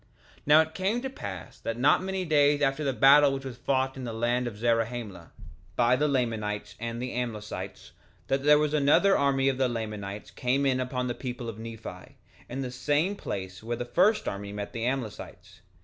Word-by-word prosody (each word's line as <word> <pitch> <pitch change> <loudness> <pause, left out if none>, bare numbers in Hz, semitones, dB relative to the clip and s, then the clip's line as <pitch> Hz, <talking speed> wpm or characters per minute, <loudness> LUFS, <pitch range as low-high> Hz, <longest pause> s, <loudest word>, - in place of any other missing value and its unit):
3:20 - - -25
Now 150 +2 +8
it 160 0 -3
came 195 +7 0
to 265 - -3
pass 95 - -8
that 115 - -4
not 130 +4 +4
many 190 0 -2
days 145 -2 +3
after 135 +2 +1
the 140 - +1
battle 140 +2 +6
which 135 0 -6
was 125 -3 -6
fought 130 +1 0
in 130 - -7
the 120 - -4
land 120 +2 0
of 110 -4 -6
Zarahemla, 115 -5 -1 0.4
by 120 +1 +4
the 150 +4 +1
Lamanites 110 -6 -1
and 115 +1 -4
the 125 +1 -4
Amlicites, 115 -4 -5 0.3
that 135 0 0
there 150 +1 +6
was 150 0 +1
another 150 +7 +4
army 135 -1 +2
of 135 -1 +1
the 130 -1 +2
Lamanites 105 -3 -5
came 130 +3 0
in 130 -2 +2
upon 125 0 -2
the 120 - -1
people 125 -1 -6
of 110 -1 -6
Nephi, 115 -1 -9 0.3
in 130 +3 -4
the 125 - -4
same 150 +9 0
place 95 - -6
where 115 +2 -3
the 120 - -4
first 195 - +2
army 100 +1 -4
met 105 0 -6
the 115 0 -3
Amlicites. 125 -5 -5
125 Hz, 200 wpm, -28 LUFS, 115-140 Hz, 0.4 s, Now